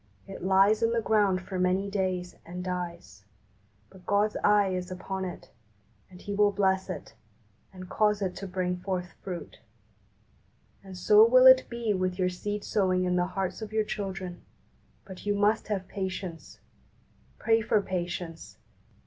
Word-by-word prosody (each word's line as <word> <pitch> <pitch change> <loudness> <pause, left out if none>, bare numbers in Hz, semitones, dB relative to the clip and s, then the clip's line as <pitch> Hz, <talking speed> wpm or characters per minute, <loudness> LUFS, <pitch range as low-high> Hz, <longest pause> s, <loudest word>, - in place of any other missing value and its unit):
It 195 - -9
lies 195 +3 +4
in 230 0 +2
the 235 - +2
ground 205 -4 +2
for 185 0 -5
many 185 +2 +1
days, 185 -3 -2
and 180 +1 -7
dies; 175 - -6 0.7
but 185 -2 -17
God's 205 +1 +2
eye 205 -1 +4
is 180 -1 -3
upon 190 +1 -4
it, 180 - -8 0.6
and 180 -1 -14
He 205 - -6
will 205 0 +3
bless 190 -1 +1
it, 165 -9 -7 0.6
and 185 -1 -10
cause 210 +1 +1
it 190 -3 -2
to 195 - -6
bring 180 -1 -2
forth 180 -1 -4
fruit. 180 -3 -7 1.2
And 190 -2 -10
so 210 +4 +6
will 255 +3 +6
it 260 0 +8
be 235 -3 -1
with 185 -1 -1
your 185 -1 +1
seed 205 +3 -4
sowing 185 -3 +1
in 180 0 +1
the 180 0 +1
hearts 190 +2 -2
of 220 -1 -6
your 220 0 +2
children; 190 -4 -5 0.6
but 190 -2 -10
you 205 - +2
must 210 +2 +1
have 195 -3 -3
patience. 190 -3 -6 0.8
Pray 225 0 +2
for 215 -1 +2
patience. 175 -3 -5
190 Hz, 160 wpm, -28 LUFS, 180-205 Hz, 1.2 s, it